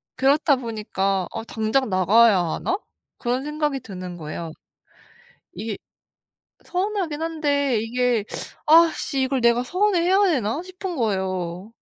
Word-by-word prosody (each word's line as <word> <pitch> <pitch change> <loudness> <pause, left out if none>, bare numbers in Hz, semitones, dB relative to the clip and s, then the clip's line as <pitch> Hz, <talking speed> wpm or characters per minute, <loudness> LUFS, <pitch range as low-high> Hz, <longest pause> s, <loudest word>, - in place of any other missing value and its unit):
그렇다 280 +2 +3
보니까 210 -6 -2
'어 - - -5
당장 225 +3 0
나가야 200 +4 +5
하나?' 180 - -1 0.4
그런 250 +2 -1
생각이 300 -1 -1
드는 185 -5 -8
거예요. 160 +1 -6 1.0
이게 220 -2 -4 0.9
서운하긴 365 -5 -2
한데 285 -6 0
이게 245 -1 0 0.4
'아 330 +1 +7
씨. 275 - -2
이걸 260 -1 0
내가 235 +1 +3
서운해 365 +5 +1
해야 375 +4 +3
되나?' 255 -2 0
싶은 370 -1 -6
거예요. 190 - -2
250 Hz, 265 characters per minute, -23 LUFS, 205-310 Hz, 1.0 s, 아